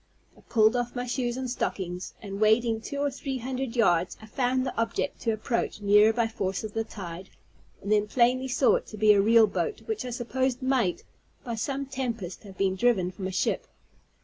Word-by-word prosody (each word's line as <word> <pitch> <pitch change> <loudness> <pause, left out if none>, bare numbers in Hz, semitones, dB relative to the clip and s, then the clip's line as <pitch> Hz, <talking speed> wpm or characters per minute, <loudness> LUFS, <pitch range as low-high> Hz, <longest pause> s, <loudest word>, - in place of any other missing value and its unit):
I - - -19
pulled 220 0 +3
off 245 0 -2
my 245 0 -2
shoes 245 0 -2
and 260 0 -3
stockings, 185 -7 -3
and, 200 0 -6
wading 220 +1 +3
two 285 - -6
or 285 0 0
three 270 0 -4
hundred 255 0 -4
yards, 180 -7 +2
I 220 - -12
found 255 +3 0
the 255 - -4
object 230 +5 -1
to 230 - +1
approach 220 +1 -2
nearer 210 +1 +5
by 230 0 +1
force 195 -4 -3
of 215 -1 -6
the 225 - 0
tide; 185 -4 -8 0.5
and 200 - -3
then 210 0 +3
plainly 255 +3 +2
saw 255 +1 +3
it - - -9
to 215 - -9
be 210 0 +6
a 200 - +4
real 225 +2 +6
boat, 190 +1 -3
which 220 +1 -3
I 250 - -5
supposed 250 +2 -1
might, 255 -9 +1 0.4
by 240 - -4
some 275 +5 -2
tempest, 235 -9 -4
have 190 -2 -12
been 190 -1 +1
driven 190 -4 +2
from 190 0 -5
a - - -4
ship. 185 - -1
225 Hz, 205 wpm, -27 LUFS, 205-250 Hz, 0.5 s, be